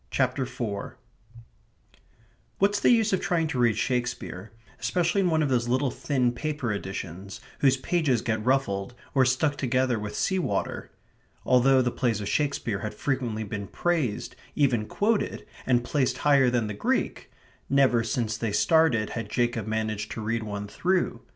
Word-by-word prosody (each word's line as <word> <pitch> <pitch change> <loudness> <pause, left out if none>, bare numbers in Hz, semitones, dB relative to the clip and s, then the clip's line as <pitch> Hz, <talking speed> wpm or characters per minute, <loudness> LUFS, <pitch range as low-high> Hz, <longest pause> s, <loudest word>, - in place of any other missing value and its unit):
CHAPTER 130 0 0
FOUR 100 -4 -5 1.6
What's 205 +1 +2
the - - +3
use 225 -4 +4
of 190 - +1
trying 175 -4 +1
to 130 - -2
read 120 -2 +3
Shakespeare, 120 -6 -2 0.3
especially 180 +2 +1
in 180 - +2
one 160 -1 +2
of 145 - 0
those 120 -2 +1
little 130 +2 +1
thin 125 -3 0
paper 145 -1 -3
editions 95 -1 -6 0.2
whose 135 -1 +4
pages 135 -3 +1
get 110 -2 -1
ruffled, 120 -4 0 0.2
or 130 -2 +4
stuck 145 +3 +1
together 130 -2 +1
with 105 0 -5
sea 190 -1 0
water? 175 - -2 0.6
Although 130 +1 +5
the 120 - 0
plays 120 -5 0
of 100 - -4
Shakespeare 140 -8 -1
had 105 -1 -5
frequently 120 -4 -2
been 100 -1 -5
praised, 155 - -1 0.2
even 125 -7 +2
quoted, 215 +1 0 0.2
and 120 -2 +3
placed 130 +1 0
higher 140 -3 +4
than 120 -2 +1
the 105 - -4
Greek, 100 - -1 0.4
never 135 -4 +4
since 110 -1 -1
they 115 -2 -2
started 125 - +3
had 115 -3 -5
Jacob 120 -3 0
managed 110 -1 -2
to 115 - -5
read 115 +2 -1
one 105 -1 -5
through. 175 - 0
125 Hz, 160 wpm, -26 LUFS, 110-145 Hz, 1.6 s, Although